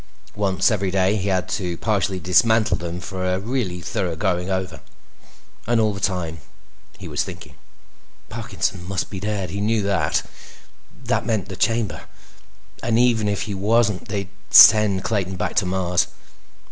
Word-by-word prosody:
Once 100 +1 +1
every 100 -3 0
day, 95 +2 +2
he 100 -1 -2
had 95 -2 0
to 90 -4 -3
partially 100 -3 -1
dismantle 105 +4 +3
them 85 +1 -5
for 95 +1 -6
a 90 0 0
really 105 -4 -3
thorough 85 -1 -2
going 90 0 -1
over. 95 -3 -3 0.9
And 120 -1 +2
all 110 -1 +2
the 95 - -6
time, 90 -5 -2 0.6
he - - -9
was - - -1
thinking. - - -10 0.7
Parkinson 90 - -3
must 95 -1 -3
be 95 - -5
dead; 100 -3 -3
he 100 - -4
knew 110 0 +1
that. 100 -1 0 0.8
That - - -1
meant 110 -5 -1
the 95 - -6
Chamber. 115 0 -1 0.8
And 115 -1 +1
even 115 -3 +3
if 100 -1 -1
he 105 - -5
wasn't, 105 0 +1
they'd 100 -3 -4 0.2
send 105 -3 +7
Clayton 95 -4 -1
back 90 - -3
to 95 - +2
Mars. 90 -1 0
95 Hz, 160 wpm, -22 LUFS, 90-105 Hz, 0.9 s, send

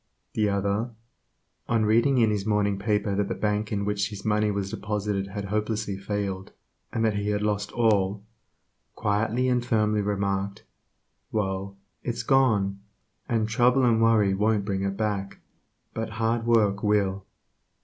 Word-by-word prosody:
The 105 -1 +1
other, 100 +3 0 0.8
on 115 -2 +2
reading 115 +5 +3
in 115 -3 +4
his 105 -2 -1
morning 100 -1 +1
paper 105 -1 0
that 100 0 0
the - - -3
bank 105 0 -1
in 100 -1 -1
which 105 0 0
his 100 -2 -9
money 105 0 +2
was 100 -1 -2
deposited 105 -2 -2
had 100 +1 -5
hopelessly 105 0 -2
failed, 95 -1 -4 0.4
and 115 - 0
that 110 - +2
he 100 0 -1
had 105 0 0
lost 105 -1 -1
all, 100 -3 +2 0.7
quietly 110 +5 0
and 125 -1 +2
firmly 105 -3 +1
remarked, 100 -1 -2 0.7
''Well, 100 -2 -2 0.3
it's 120 -2 -3
gone, 110 -8 +2 0.5
and 115 -2 +1
trouble 125 +3 +3
and 115 -2 +3
worry 110 -4 +4
won't 105 +1 +1
bring 95 -2 -1
it 100 0 -2
back, 105 -2 -2 0.6
but 110 0 -3
hard 115 +1 0
work 105 -4 +3
will." 100 -2 +1
105 Hz, 150 wpm, -26 LUFS, 100-110 Hz, 0.8 s, in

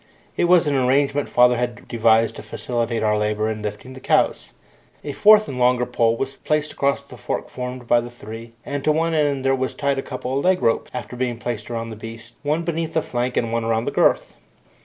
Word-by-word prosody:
It - - +2
was 175 -1 +5
an 145 - +1
arrangement 140 +2 +2
father 125 0 +4
had 120 0 -4
devised 115 -1 +3
to - - -7
facilitate 120 -2 -3
our 105 -1 +2
labour 105 +1 0
in 110 -1 -5
lifting 105 +5 -6
the 130 - -10
cows. - - +1 0.5
A 145 - -4
fourth 215 +8 +6
and 130 -2 -5
longer 125 0 +3
pole 115 -2 +1
was 135 +2 -4
placed 150 0 -1
across 140 0 0
the - - -14
fork - - -4
formed 125 -1 -6
by 120 0 +4
the 120 - -7
three, 115 -1 -10
and 140 -1 -4
to 155 - +3
one 165 +2 +1
end 145 -3 +1
of 135 0 +2
this 130 - -1
were - - -23
tied 140 -1 0
a - - -1
couple 130 -1 -5
of 140 - 0
leg 185 0 +3
ropes, 115 - +1
after - - -6
being 125 -1 -2
placed 115 -2 -5
round 115 -1 -4
the - - -6
beast, 115 +2 -10
one 155 +3 0
beneath 165 -1 -3
the 160 - +2
flank 125 +1 -2
and 115 -1 0
one 115 0 0
around 115 0 0
the - - -1
girth. - - +2
125 Hz, 230 wpm, -22 LUFS, 115-140 Hz, 0.5 s, fourth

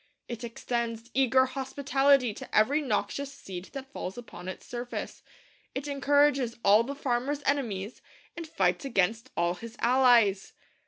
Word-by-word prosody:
It 235 0 -6
extends 235 0 -4
eager 260 0 +4
hospitality 270 -1 +2
to - - -5
every 275 +8 +4
noxious 280 0 -2
seed 190 -10 -8
that 270 0 -8
falls 190 - -5
upon 210 -7 -10
its 185 - -7
surface. 245 0 -6 0.5
It 275 +2 -4
encourages 280 -3 +2
all 205 +2 +7
the 280 +4 -5
farmer's 275 +2 -1
enemies, 230 -7 -1 0.3
and 335 -1 -6
fights 180 - 0
against 225 -3 0
all 170 0 +2
his 230 +5 -10
allies. 235 -6 +4
245 Hz, 140 wpm, -28 LUFS, 220-275 Hz, 0.5 s, all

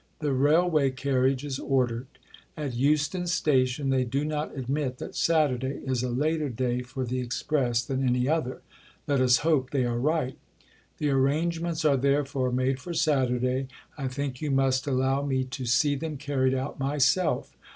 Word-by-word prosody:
The 150 -3 -1
railway 150 +2 +3
carriage 130 0 0
is 135 -2 -4
ordered. 125 -2 0 0.5
At 145 -4 -3
Euston 150 +7 +1
Station 135 -5 +1
they 130 -1 +2
do 135 +4 -1
not 150 -1 -3
admit 130 0 -2
that - - -7
Saturday 140 -5 +1
is 130 -2 0
a 125 - -2
later 150 +4 0
day 125 0 -1
for 130 +1 -5
the 125 +1 -2
Express 125 -1 0
than 135 0 -2
any 125 0 +1
other; 150 -4 -1 0.4
let 140 -2 +2
us 125 0 +5
hope 145 -6 +2
they 130 -2 0
are 120 -1 -1
right. 145 -1 0 0.6
The 150 -2 0
arrangements 160 +4 0
are 140 -2 +4
therefore 140 -1 +1
made 130 +1 0
for 170 +6 -6
Saturday. 130 -4 +1 0.3
I 135 -3 -3
think 130 -1 -4
you 150 - -2
must 135 0 +1
allow 135 0 +1
me 135 -2 0
to 130 -1 -6
see 145 +5 +3
them 150 +1 -4
carried 135 -2 0
out 130 +2 -4
myself. 145 +6 +1
135 Hz, 165 wpm, -27 LUFS, 130-150 Hz, 0.6 s, us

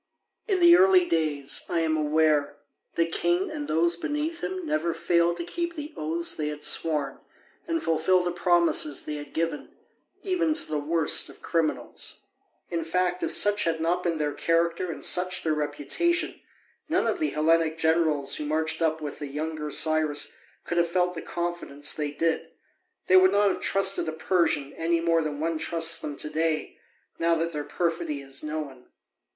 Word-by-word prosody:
In 390 -4 +1
the 345 0 +8
early 370 0 +5
days, 150 -4 0
I 170 - +1
am 160 -1 +1
aware, 150 -1 +1 0.4
the 165 - +2
king 345 - 0
and 295 -1 -5
those 170 +2 +2
beneath 300 - -3
him 375 -2 -4
never 165 - -1
failed 170 0 +1
to 170 - -3
keep 340 - -4
the 300 0 -7
oaths 165 +2 0
they 150 - -2
had 150 0 -6
sworn 150 -4 +1 0.5
and 330 -1 -1
fulfil 165 +3 +2
the 175 - -1
promises 175 -4 +2
they 150 0 -4
had 145 -1 -9
given, 165 -2 -3 0.5
even 345 -5 0
to - - +3
the 155 -1 -2
worst 160 +2 +2
of - - -16
criminals. 165 -3 -2 0.5
In 165 -1 -1
fact, 180 +2 -1
if - - 0
such 205 0 +4
had 165 -1 0
not 170 +2 0
been 170 -2 -1
their 150 -1 -1
character 170 +2 0
and - - -5
such 180 0 +2
their 160 - +1
reputation, 150 - -1 0.5
none - - +1
of 365 - -1
the 310 - 0
Hellenic 160 +1 +1
generals 160 -4 +1
who 150 - -4
marched 160 +2 -1
up 160 -1 0
with 150 -1 -6
the 145 - -5
younger 150 +1 -4
Cyrus 150 -1 +1 0.3
could 175 - -1
have 170 0 +1
felt 180 0 +1
the 165 - -6
confidence 170 -4 -3
they 150 -1 -3
did: 160 +3 -1 0.6
they 185 - +6
would 185 0 +6
not 205 0 +4
have - - -3
trusted 195 -3 +2
a - - -5
Persian 160 -4 0
any 165 +1 0
more 165 0 +2
than 150 -2 -4
one 160 0 -1
trusts 165 0 +1
them 145 - -6
to - - -2
day, 160 0 -2 0.4
now 165 0 +2
that 165 +1 -1
their 150 -2 -4
perfidy 165 -3 -2
is 135 0 -5
known. 150 -4 -6
165 Hz, 180 wpm, -26 LUFS, 155-180 Hz, 0.6 s, the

